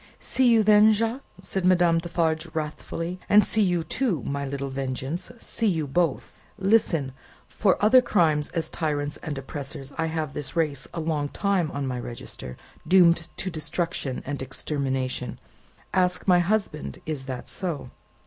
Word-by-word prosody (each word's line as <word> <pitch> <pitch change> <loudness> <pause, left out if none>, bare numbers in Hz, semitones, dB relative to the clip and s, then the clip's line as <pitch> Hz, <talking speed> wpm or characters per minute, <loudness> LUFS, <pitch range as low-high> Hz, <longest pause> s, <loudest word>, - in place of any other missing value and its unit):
"See 260 -2 +2
you 225 -2 +5
then, 210 +1 +7
Jacques," 230 +5 -1 0.2
said 190 0 -2
Madame 175 -2 +4
Defarge, 165 -1 -1
wrathfully; 165 +3 -4
"and 210 +1 +7
see 220 - +2
you, 175 -4 +2
too, 195 - -1
my 140 0 -3
little 140 0 -4
Vengeance; 135 +6 -4
see 230 0 0
you 165 -6 +1
both! 160 +2 -1 0.2
Listen! 190 -9 +2 0.4
For 195 -3 +2
other 255 +4 +7
crimes 160 -11 +2
as 165 -2 -3
tyrants 145 -2 -2
and 150 -3 -5
oppressors, 135 0 -6
I 165 - +1
have 160 -3 -3
this 145 -2 -6
race 150 -5 0
a - - -2
long 155 -3 -1
time 195 -4 0
on 140 -1 -3
my 125 -2 -2
register, 120 - -7 0.3
doomed 170 -3 +5
to 190 - -3
destruction 155 -3 -3
and 145 0 -4
extermination. 130 -2 -2 0.5
Ask 180 0 +1
my 180 -1 +6
husband, 175 -4 -1
is 150 -4 -4
that 130 -2 -6
so." 170 -7 -4
160 Hz, 155 wpm, -25 LUFS, 140-185 Hz, 0.5 s, then